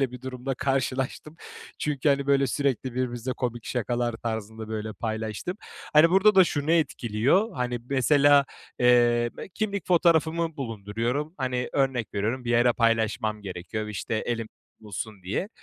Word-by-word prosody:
böyle, 135 -3 +1
bir 125 - -8
durumla 130 +1 -4
karşılaştım. 135 +3 -2 0.4
Çünkü, 150 -1 0
hani, 140 0 +2
böyle, 140 -1 +3
sürekli 130 -2 -1
birbirimizle 125 0 -2
komik 120 -2 -4
şakalar 120 0 -1
tarzında, 110 -1 -5
böyle, 110 0 -4
paylaştığım. 110 - -4 0.4
Hani, 155 +2 +6
burada 195 +3 +5
da 190 - +8
şunu 150 -2 -2
etkiliyor. 140 - +1
Hani, 125 -1 -2
mesela, 140 +2 +5 0.3
eee, 120 -1 +4 0.2
kimlik 200 -4 -2
fotoğrafımı 165 -2 +2
bulunduruyorum. 120 - -3
Hani, 125 -1 -1
örnek 135 -5 0
veriyorum 115 +6 -1
bir 120 - -2
yere 120 +1 +4
paylaşmam 110 -2 0
gerekiyor, 95 +3 -5
işte, 105 +1 -4
elimde 115 0 -2 0.3
bulsun 105 -1 -7
diye. 100 - -2
125 Hz, 140 wpm, -26 LUFS, 110-140 Hz, 0.4 s, da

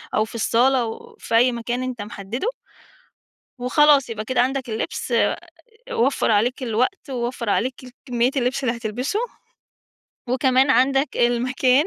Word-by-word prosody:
أو 215 - +2
في 225 - -12
الصالة 245 +3 +3
أو 445 - -6
في 230 - -2
أي 245 +2 +5
مكان 240 +2 -3
أنت 250 -4 -4
محدِّده 210 - -5 1.1
وخلاص 275 0 +4
يبقى 215 -1 -4
كده 250 +1 0
عندك 260 0 0
اللبس 220 - -4
آآ - - +3 0.6
وفَّر 250 -1 +1
عليك 245 +6 +1
الوقت 250 - -1
ووفَّر 240 -3 -3
عليك 255 +5 +1 0.3
كمّية 245 0 +1
اللبس 255 +2 0
اللي 235 -1 0
هتلبسه 245 - -2 1.1
وكمان 260 +1 +3
عندك 270 +2 +2
المكان 255 +4 +2
250 Hz, 135 wpm, -22 LUFS, 235-265 Hz, 1.1 s, أي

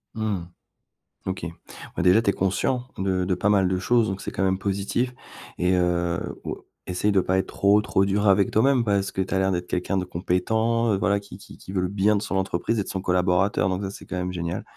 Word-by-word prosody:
Mmh. 105 -5 -2 0.8
OK. 95 -2 -3 0.5
Ouais, - - 0
déjà 90 +5 +5
tu 100 - +1
es - - -7
conscient 120 +7 0
de 95 -1 0
de 90 -1 +1
pas 100 +3 0
mal 95 -3 +4
de 95 0 0
choses 115 +4 +2
donc 95 0 -4
c'est - - -5
quand 95 - -2
même 95 0 +2
positif. 100 +6 -1 0.4
Et 90 +1 +2
heu, 85 -1 +1 0.2
oua - - -6 0.2
essaye 95 +3 0
de 100 - +4
pas 95 +1 0
être 95 - +1
trop, 100 +1 +3
trop 95 - +2
dur 100 +2 +1
avec 100 0 +4
toi-même, 125 +2 +3
parce 100 -2 0
que 95 - -2
tu 95 - -4
as - - +2
l'air 95 0 +2
d'être 90 0 -2
quelqu'un 90 +2 -1
de 90 - -1
compétent, 110 +6 0
heu, - - +1
voilà 100 0 +1
qui 100 - -12
qui - - -14
qui 95 - -10
veut 95 -2 0
le 90 - 0
bien 100 +2 +2
de 100 - 0
son - - -3
entreprise 95 +3 0
et - - +1
de - - -15
son 95 - -3
collaborateur 90 +1 +2
donc 95 +2 -2
ça 95 - -3
c'est - - -11
quand - - -5
même 90 0 -2
génial. 85 -1 -3
95 Hz, 245 wpm, -24 LUFS, 90-105 Hz, 0.8 s, déjà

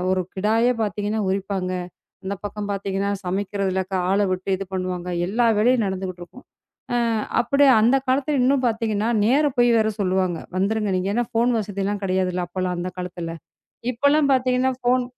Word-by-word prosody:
ஒரு 185 0 +2
கிடாய்யே 225 +5 +2
பார்த்தீங்கன்னா 210 +1 -2
உரிப்பாங்க. 190 -1 -2 0.5
அந்தப் 200 +1 -5
பக்கம் 205 0 -4
பார்த்தீங்கன்னா 195 0 -2
சமைக்கிறதுல 190 0 -1 0.3
ஆள 200 +1 +2
விட்டு 185 +1 -3
இது 195 - -5
பண்ணுவாங்க. 185 -1 -3 0.2
எல்லா 230 +6 +1
வேலையும் 240 0 +3
நடந்துட்டு 185 -1 -4
இருக்கும். 175 +9 -13 0.5
ஆ - - +2 0.4
அப்பிடியே 275 +3 +4
அந்தக் 260 +4 +3
காலத்துல 280 +2 +1
இன்னும் 265 +1 +3
பாத்தீங்கன்னா, 220 -1 0 0.2
நேரா 285 +6 +3
போயி 240 0 +5
வேற 220 - +2
சொல்லுவாங்க. 185 -2 0 0.2
"வந்திருங்க" 205 +1 0
நீங்க, 185 +1 -1
ஏன்னா 240 0 +1
ஃபோன் 235 +2 +2
வசதி 200 -2 -3
எல்லாம் 205 0 -2
கிடையாதுல்ல 185 -1 0
அப்பல்லாம் 180 -1 -2
அந்தக் 180 +1 -5
காலத்துல. 175 -2 -5 0.6
இப்ப 235 - -22
எல்லாம் 300 -2 +3
பாத்தீங்கன்னா 255 0 +2
ஃபோன் 250 +1 +2
205 Hz, 160 wpm, -23 LUFS, 185-240 Hz, 0.6 s, போயி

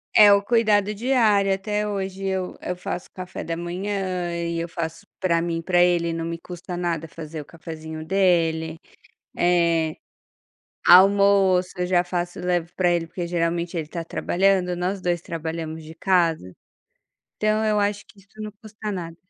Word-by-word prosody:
É 210 -1 +9
o 200 0 +5
cuidado 210 -2 +2
diário, 215 -4 +3
até 210 +2 -1
hoje 195 -1 -4
eu 190 -1 -2
eu 180 - -3
faço 180 0 -5
café 185 -1 -6
da 165 0 -3
manhã 185 0 -3
e 170 0 -2
eu 170 0 -3
faço 165 +4 -5
para 170 -3 +2
mim 170 -1 -2
e 165 - -5
para 175 0 +3
ele, 170 -2 +3
não 165 - -3
me 165 0 -3
custa 175 +1 -7
nada 170 -2 -2
fazer 155 +1 -7
o - - -12
cafezinho 160 -1 -8
dele. 165 -4 +1 0.6
Eh, 170 -2 +2 0.9
almoço 195 0 +6
eu 180 - 0
já 180 -1 +3
faço 175 0 -3
levo 175 -2 0
para 180 -2 +2
ele, 170 -1 +1
porque 170 +1 -5
geralmente 170 0 -1
ele 160 -2 -2
tá 165 +2 -5
trabalhando, 180 +1 +1
nós 185 +2 -2
2 175 -2 -1
trabalhamos 160 -1 -5
de 160 +1 -10
casa. 165 - +1 0.9
Então 215 +1 +1
eu 215 -1 +2
acho 205 0 0
que - - -20
isso 195 - -23
não 215 - -5
custa 215 -1 -7
nada. 170 -3 -5
180 Hz, 170 wpm, -23 LUFS, 165-195 Hz, 0.9 s, É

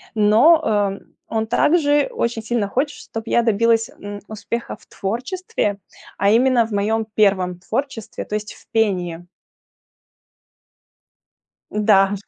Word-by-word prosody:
но, 225 +11 +5
эм, 205 -2 -1
он 220 -1 -2
также 290 +1 +3
очень 235 -1 -2
сильно 225 -3 -1
хочет, 280 +7 -1
чтоб 225 0 -7
я 235 - +3
добилась, 230 0 +2
м, 205 0 -7
успеха 225 +2 -5
в - - -23
творчестве, 235 - -3 0.4
а 200 - +2
именно 240 +1 +4
в 225 - -10
моем 220 +2 0
первом 185 -4 +2
творчестве, 230 +3 -4
то 210 - -4
есть 210 0 -4
в - - -20
пении. 180 -6 0 2.5
Да. 205 -2 +3
220 Hz, 120 wpm, -20 LUFS, 205-235 Hz, 2.5 s, но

